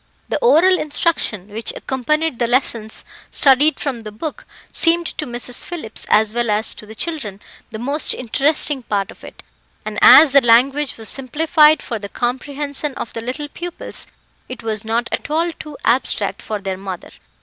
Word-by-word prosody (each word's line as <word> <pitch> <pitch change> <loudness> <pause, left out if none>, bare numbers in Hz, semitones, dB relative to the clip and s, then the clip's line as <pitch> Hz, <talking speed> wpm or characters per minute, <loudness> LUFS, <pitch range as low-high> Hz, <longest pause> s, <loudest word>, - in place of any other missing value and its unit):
The - - 0
oral 375 -6 +5
instruction 290 - -1
which 220 +2 -3
accompanied 305 +2 -1
the 240 - +1
lessons 230 -3 0 0.2
studied 285 +3 +4
from 260 -5 -3
the 215 -1 -8
book, 285 +9 -6 0.3
seemed 335 +1 +3
to 305 - -2
Mrs. 245 0 -3
Phillips 310 -11 -6
as 215 0 +4
well 240 -1 0
as 210 +1 0
to 215 - -12
the 220 - -10
children, 225 - -4 0.3
the 220 - -7
most 280 +7 -1
interesting 280 +3 +1
part 200 -4 -2
of - - -17
it, - - -12 0.4
and - - -4
as 315 -3 +9
the 280 +1 +6
language 265 +5 +3
was 225 -1 -4
simplified 300 +4 +3
for 230 -3 -4
the 200 0 -7
comprehension 280 +4 -3
of 235 - -6
the 230 - -5
little 260 +6 -4
pupils, 345 +4 -7 0.4
it 255 -2 -8
was 220 -1 -2
not 230 +2 -1
at - - -3
all 330 +3 +1
too 300 -2 -10
abstract 215 -5 0
for 215 - -4
their 195 -2 -4
mother. 190 -2 -7
255 Hz, 170 wpm, -19 LUFS, 220-300 Hz, 0.4 s, as